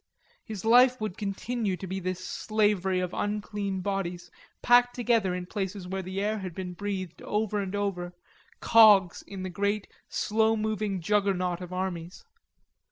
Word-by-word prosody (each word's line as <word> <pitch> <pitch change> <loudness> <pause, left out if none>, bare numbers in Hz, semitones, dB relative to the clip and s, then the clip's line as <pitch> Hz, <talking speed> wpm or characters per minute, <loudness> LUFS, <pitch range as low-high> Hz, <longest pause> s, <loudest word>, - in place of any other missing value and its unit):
His 215 -2 -7
life 250 +2 +6
would 215 -4 -3
continue 205 0 -2
to 190 - -7
be 190 +1 -4
this 185 0 -4
slavery 205 -4 +1
of 180 0 -3
unclean 205 -2 -2
bodies 180 -3 -3 0.3
packed 245 0 +5
together 230 -6 +1
in 180 0 -4
places 190 -1 -4
where 190 +1 -3
the 190 +1 -5
air 210 +2 0
had 185 -4 -6
been 180 -1 -5
breathed 185 -3 -5
over 210 0 -1
and 195 0 -4
over, 190 -3 -2 0.5
cogs 210 -6 +6
in 195 -2 -8
the 185 - -3
great 200 +3 -1 0.2
slow 220 +1 +1
moving 215 -3 -2
Juggernaut 185 -2 +1
of 180 0 -7
armies. 180 - -4
195 Hz, 155 wpm, -28 LUFS, 185-215 Hz, 0.5 s, life